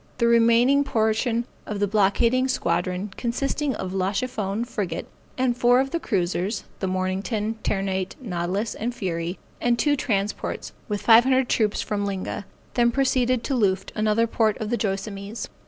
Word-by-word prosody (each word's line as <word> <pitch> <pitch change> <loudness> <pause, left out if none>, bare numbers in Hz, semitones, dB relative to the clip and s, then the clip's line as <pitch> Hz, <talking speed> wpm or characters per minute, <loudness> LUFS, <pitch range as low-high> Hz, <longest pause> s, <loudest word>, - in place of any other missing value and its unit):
The 235 - +2
remaining 235 +4 +5
portion 230 -1 +1 0.2
of 210 -1 -3
the 205 - +3
blockading 220 +5 +2
squadron 190 -5 -1
consisting 270 +3 -1
of 185 -2 -4
La 190 0 0
Chiffone, 220 -2 -2
frigate, 210 -6 -3 0.3
and 255 -2 +1
four 245 +1 +4
of 270 0 0
the 335 - 0
cruisers, 190 - -1 0.2
the 190 - -1
Mornington, 195 +4 -2
Ternate, 190 -2 -1
Nautilus, 195 -1 -2
and 240 +2 -3
Fury, 175 -3 -3 0.2
and 240 -1 +2
two 290 +4 +2
transports, 210 -6 -2 0.2
with 205 -1 -2
five 230 +1 +8
hundred 260 -1 +2
troops 215 -2 +1
from 205 -1 -2
Linga, 195 0 -4 0.3
then 240 -1 +4
proceeded 255 -1 +1
to 280 - -2
Luft, 195 -5 +1
another 215 +1 +2
port 220 -2 +1
of 220 -1 -4
the - - +3
Joassamees. 200 +1 -4
220 Hz, 155 wpm, -24 LUFS, 195-245 Hz, 0.3 s, five